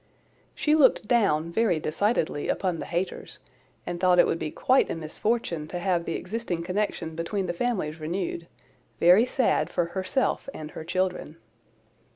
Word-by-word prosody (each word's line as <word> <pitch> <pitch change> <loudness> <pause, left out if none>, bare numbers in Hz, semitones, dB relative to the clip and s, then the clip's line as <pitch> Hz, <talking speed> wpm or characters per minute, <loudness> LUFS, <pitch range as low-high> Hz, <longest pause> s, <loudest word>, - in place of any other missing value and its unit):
She 300 - +1
looked 270 -8 +4
down 170 -9 +2
very 195 -4 +2
decidedly 155 -1 0
upon 180 -4 -1
the - - -5
Hayters, 175 +3 -4 0.5
and 175 - -4
thought 180 -1 +4
it - - +7
would 165 - -1
be 155 - -3
quite 260 - +2
a - - -2
misfortune 165 0 -2
to 175 - -5
have 175 -1 0
the 165 - -2
existing 185 -5 -3
connection 180 -3 -2
between 185 +4 -2
the 175 - -2
families 175 -7 -2
renewed—very 170 - 0
sad 225 - +1
for 175 - 0
herself 195 +8 -1
and 155 0 -7
her - - -7
children. 180 -2 -2
175 Hz, 155 wpm, -26 LUFS, 160-210 Hz, 0.5 s, it